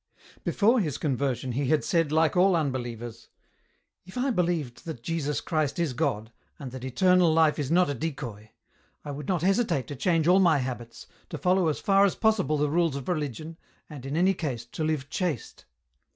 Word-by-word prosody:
Before 230 +4 +3
his 150 - -1
conversion 130 -3 -1
he 135 +3 -1
had 155 +1 +2
said 165 -5 +1
Hke 160 +2 +2
all 185 +1 +4
unbelievers: 120 -6 -4 0.4
" - - -45
If 185 - -10
I 260 +2 +1
believed 170 - -1
that 155 -8 -7
Jesus 150 -2 -2
Christ 155 -3 -1
is 170 -6 0
God, 120 -6 -2 0.3
and 135 -4 -8
that 130 -1 -8
eternal 175 +6 +3
life 160 -1 +3
is 140 -2 -2
not 180 +2 +4
a 145 - -1
decoy, 120 -7 -6 0.6
I 145 - -4
would 145 0 -7
not 175 -4 0
hesitate 195 - +1
to 145 - -5
change 165 +3 +1
all 185 +2 +6
my 170 -5 +4
habits, 125 -3 -5 0.2
to - - -5
follow 180 -1 +2
as 155 - -1
far 195 0 +4
as 200 - +2
possible 215 -9 +1
the 150 +1 +1
rules 165 -3 +1
of 140 -2 -6
religion, 155 0 -3 0.3
and, 145 -4 -9
in 140 +3 -3
any 185 +3 +4
case, 135 -10 -4
to 140 +6 -5
live 155 -3 -1
chaste." 175 - -3
155 Hz, 195 wpm, -27 LUFS, 130-175 Hz, 0.6 s, all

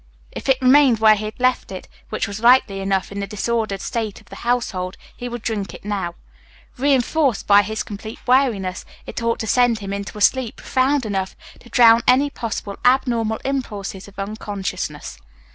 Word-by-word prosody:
If - - -6
it 265 -1 +4
remained 260 -2 +6
where 220 0 +6
he 215 0 -3
had 215 - -7
left 255 -4 +1
it, 185 - -8 0.2
which - - -2
was 200 +1 -6
likely 235 -4 +4
enough 195 -1 -1
in 200 - -5
the 200 - -3
disordered 215 -1 -2
state 220 -4 -3
of - - -22
the - - -10
household, 200 -7 -2 0.2
he 245 - -6
would 240 -2 -7
drink 210 -4 -3
it - - -14
now. 195 -5 -3 0.6
Reinforced 270 -1 +1
by 205 0 +6
his 210 -2 -3
complete 215 +3 -8
weariness, 230 -8 +1 0.2
it - - -6
ought 230 0 0
to - - -3
send 245 +1 +3
him 200 -2 -5
into 200 +1 -6
a - - -7
sleep 255 +1 +2
profound 265 0 0
enough 195 -3 -3 0.2
to 240 - -17
drown 230 -1 +6
any 280 +3 +4
possible 215 -5 -5
abnormal 235 -3 +2
impulses 205 -8 -4
of 200 - -16
unconsciousness. 200 - -5
220 Hz, 180 wpm, -21 LUFS, 200-245 Hz, 0.6 s, remained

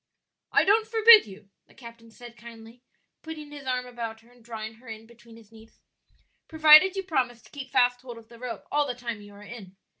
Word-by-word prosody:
"I - - +3
don't 435 +2 +2
forbid 445 -1 +6
you," 195 0 -15 0.2
the - - -24
captain 230 -2 -14
said 235 +1 -14
kindly, 230 +1 -15 0.4
putting 310 -2 -10
his 285 -2 -11
arm 250 -1 -2
about 230 -2 -8
her 235 +2 -24
and 245 -1 -23
drawing 220 -1 -8
her 245 +2 -20
in 220 0 -10
between 235 0 -18
his 225 -1 -20
knees; 225 0 -19 0.7
"provided 315 +4 +6
you 385 - -4
promise 250 -9 -3
to - - -21
keep 275 -2 -9
fast 245 -1 +1
hold 245 -2 -11
of 225 -1 -15
the 235 0 -17
rope 250 -1 -8
all 295 0 0
the 250 - -5
time 235 -3 -7
you 205 0 -15
are 205 - -14
in. 205 -4 -12
240 Hz, 215 wpm, -25 LUFS, 225-285 Hz, 0.7 s, forbid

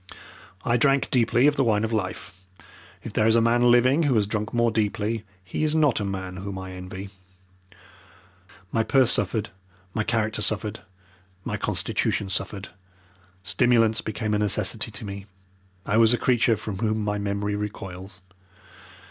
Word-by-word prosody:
I 120 0 +2
drank 135 +2 +2
deeply 120 0 +3
of 145 0 +3
the 135 - +3
wine 110 -3 +2
of 110 +1 -2
life 95 -2 -4 0.6
if - - -7
there 110 - +2
is 110 - +4
a - - +5
man 120 +1 +3
living 130 +5 +4
who 145 -6 +2
has 105 -2 +3
drunk 105 +1 -3
more 120 -1 +2
deeply 110 0 -1 0.2
he 95 - -3
is 155 0 +1
not 150 -7 +3
a - - -2
man 95 -2 -5
whom 95 0 -6
I 95 0 -7
envy. 95 +1 -8 1.6
My 115 - +1
purse 130 +2 +3
suffered, 110 -2 +1 0.4
my 110 - 0
character 110 -1 -1
suffered, 105 0 -2 0.7
my - - -2
constitution 100 - 0
suffered, 95 +1 -3 0.7
stimulants 115 +1 +3
became 110 0 -3
a 105 - +1
necessity 105 -2 +1
to - - -7
me, 100 0 -7 0.6
I 105 - +1
was 115 +1 +5
a - - -4
creature 120 -3 +2
from 105 -3 -6
whom 110 -1 0
my 105 0 -1
memory 100 0 -2
recoils. 95 -2 -7
110 Hz, 160 wpm, -25 LUFS, 100-115 Hz, 1.6 s, a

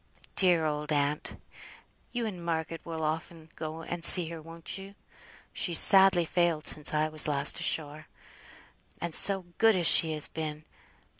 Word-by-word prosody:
Dear 175 -4 +3
old 150 0 -5
aunt! 145 0 -3 0.7
you 240 -2 -4
and 185 -6 -8
Margaret 165 -1 -5
will 160 -1 -7
often 160 +1 -6
go 160 +1 -8
and 170 +1 -7
see 170 -2 +9
her, 165 -1 -9
won't 165 +4 -8
you? 195 +1 -13 0.6
She's 170 -3 -1
sadly 190 -3 +5
failed 170 -2 -2
since 150 - -3
I 155 0 -1
was 155 -1 +3
last 140 -2 0
ashore. 155 0 -4 0.9
And 170 -1 -6
so 195 0 +2
good 225 -2 +3
as 175 -2 -2
she 160 0 +3
has 150 -1 -4
been! 155 -1 -8
160 Hz, 155 wpm, -27 LUFS, 155-175 Hz, 0.9 s, see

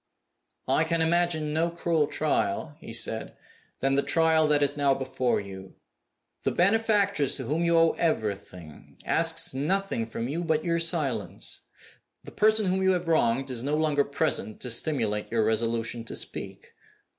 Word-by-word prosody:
"I 155 - +3
can 165 +1 -1
imagine 160 -2 +1
no 165 +2 +1
crueler 165 -3 0
trial," 155 +1 -1
he - - -10
said, 110 -1 0 0.4
"than 135 +1 +1
the 140 - +3
trial 160 0 +3
that 145 -1 +3
is 145 0 +1
now 140 -2 +2
before 130 -2 -1
you. 95 -1 -10 0.7
The - - 0
benefactress 200 - +2
to - - -6
whom 160 +4 -1
you 170 0 +3
owe 165 0 +5
everything 100 - -4
asks 165 -2 +3
nothing 150 -3 -1
from 115 +1 -4
you 165 +6 -3
but 160 -1 0
your 170 -1 +1
silence. 165 -5 -2 0.6
The - - -11
person 215 0 +3
whom 190 +1 0
you 190 0 +3
have 180 -1 -3
wronged 135 -4 +1
is 120 -2 -4
no 145 +2 0
longer 150 -2 +2
present 140 -6 -1
to 125 - -2
stimulate 115 -5 -1
your 115 -2 +1
resolution 115 +1 -1
to - - -6
speak. - - -6
150 Hz, 160 wpm, -27 LUFS, 120-170 Hz, 0.7 s, owe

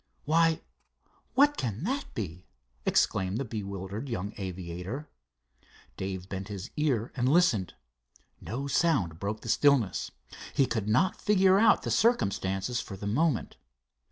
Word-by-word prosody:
"Why, 165 +1 +3 0.7
what 290 +2 +5
can 115 +2 -3
that 270 +8 -2
be?" 90 - -5 0.4
exclaimed 95 +2 +2
the 135 - -2
bewildered 100 +2 -5
young 105 -3 -3
aviator. 95 - -5 0.9
Dave 95 +1 -4
bent 95 0 -5
his 100 +2 -7
ear 130 -7 0
and 125 -1 +1
listened. 135 - +3 0.6
No 130 +5 -4
sound 115 - +1
broke 105 +2 -3
the - - -9
stillness. 135 -9 +3 0.5
He 135 - +4
could 110 -5 -2
not 125 +13 +2
figure 195 -2 +4
out 225 +1 +5
the - - -2
circumstances 100 - +1
for 100 - -8
the 100 - -7
moment. 130 +5 0
110 Hz, 130 wpm, -29 LUFS, 95-150 Hz, 0.9 s, what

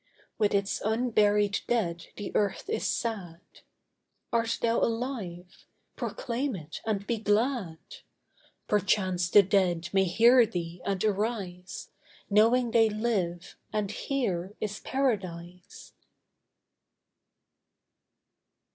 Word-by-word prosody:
With 210 -2 +2
its 200 0 0
unburied 210 -3 +2
dead 175 -8 -1
the 205 - -6
earth 205 - 0
is 445 - -1
sad. 190 -8 -3 0.9
Art 230 0 +1
thou 230 0 +2
alive? 225 -7 -3 0.3
proclaim 250 +1 -3
it 160 -3 -8
and 200 -2 -1
be 230 -1 -1
glad. 210 -4 0 0.9
Perchance 185 -3 +1
the 205 +2 +7
dead 180 -3 +1
may 195 0 +4
hear 235 +7 +6
thee 175 -4 -5
and 195 0 -1
arise, 200 -4 -3 0.4
Knowing 230 +4 +4
they 225 -1 +5
live, 205 -6 -2 0.2
and 210 -2 -1
here 210 -8 -2
is 210 0 -3
Paradise. 180 -9 -3
205 Hz, 100 wpm, -28 LUFS, 180-230 Hz, 0.9 s, the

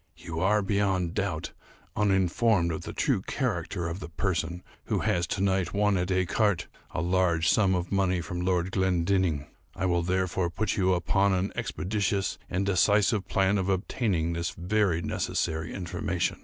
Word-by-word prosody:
You 80 -1 -6
are, 100 +4 +3
beyond 95 -3 0
doubt, - - -2 0.4
uninformed 95 -1 +2
of 80 - -4
the - - -6
true - - +1
character 85 -1 -2
of 85 +2 -4
the 90 - -7
person 85 0 -2 0.2
who - - 0
has 85 0 +1
to 95 - -2
night 95 -2 +1
won 105 0 +3
at 90 -1 0
écarté 95 +1 +1 0.2
a - - -3
large 85 -2 +2
sum 95 +1 +4
of 90 0 -3
money 95 -2 +2
from 90 0 -4
Lord 90 0 0
Glendinning. 90 -4 +1 0.3
I 95 - -2
will 85 -1 +2
therefore 90 0 0
put 105 +4 -1
you 95 -1 +2
upon 95 +3 +2
an 95 +2 -1
expeditious 100 0 -1
and 95 +2 -1
decisive 100 +1 +3
plan 95 +1 +2
of 95 0 -1
obtaining 95 -3 0
this 85 0 -2
very 90 -2 +1
necessary 80 0 -2
information. 90 -3 -2
95 Hz, 160 wpm, -28 LUFS, 85-100 Hz, 0.4 s, sum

